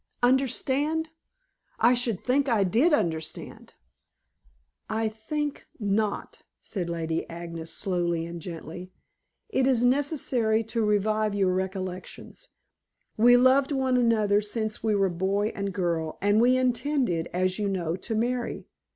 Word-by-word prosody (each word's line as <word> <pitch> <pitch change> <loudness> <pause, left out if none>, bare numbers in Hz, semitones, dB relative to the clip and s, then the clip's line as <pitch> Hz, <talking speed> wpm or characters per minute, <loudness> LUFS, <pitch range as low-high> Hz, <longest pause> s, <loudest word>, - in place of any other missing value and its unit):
Understand! 275 +5 +1 0.7
I 240 +2 +5
should 240 -5 -1
think 275 +2 +1
I 220 -4 +3
did 235 - +3
understand." 160 - -2 1.1
"I 220 0 0
think 290 +7 -4
not," 205 0 -1 0.2
said 180 -5 -5
Lady 165 -1 -2
Agnes 170 -1 -7
slowly 175 -4 -1
and 170 0 -7
gently. 175 +1 -8 0.6
"It 265 -11 +1
is 245 -2 +3
necessary 250 -5 +1
to 225 +1 -2
revive 210 0 +1
your 190 -2 +2
recollections. 185 -1 -5 0.7
We 245 +3 +6
loved 265 +3 +4
one 265 -2 +1
another 215 -4 +3
since 215 +1 -3
we 220 -2 +1
were 195 -1 +3
boy 190 +4 0
and 200 0 -3
girl, 170 -4 -2
and 205 +3 +3
we 250 +2 +4
intended, 250 - 0
as 185 +2 0
you 205 -1 0
know, 175 -4 -1
to 225 +4 -4
marry. 240 +2 -2
215 Hz, 130 wpm, -26 LUFS, 185-250 Hz, 1.1 s, We